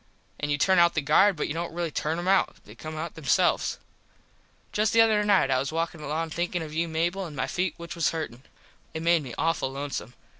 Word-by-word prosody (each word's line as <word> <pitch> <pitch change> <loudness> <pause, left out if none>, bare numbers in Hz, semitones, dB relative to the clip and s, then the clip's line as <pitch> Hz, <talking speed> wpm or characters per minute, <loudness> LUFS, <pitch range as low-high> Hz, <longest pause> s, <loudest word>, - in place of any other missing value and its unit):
An 150 - -2
you 145 - +1
turn 190 +5 +4
out 170 0 +5
the 155 - +2
guard 190 +8 +5
but 150 - -2
you - - -3
dont 170 +1 -3
really 170 -2 -2
turn 155 +2 -1
em 175 +1 -4
out. 195 0 +3
They 105 - -12
come 155 +7 -8
out 160 +1 -4
them 160 - -11
selves. - - +2 0.9
Just 210 0 +1
the 230 - +7
other 215 -2 +4
night 200 -9 +3
I 130 - +3
was 135 +2 -2
walkin 165 0 -2
along 155 +2 -3
thinkin 175 +1 -2
of 155 -1 -8
you 165 +2 0
Mable 170 +4 -1
an 150 - -10
my - - -1
feet 180 -3 -2
which 170 -1 -7
was 170 -3 +1
hurtin. 155 -7 -5 0.5
It 160 - -3
made 170 -1 +4
me 130 -4 -8
awful 165 -5 0
lonesome. 135 -3 -5
165 Hz, 235 wpm, -27 LUFS, 150-175 Hz, 0.9 s, the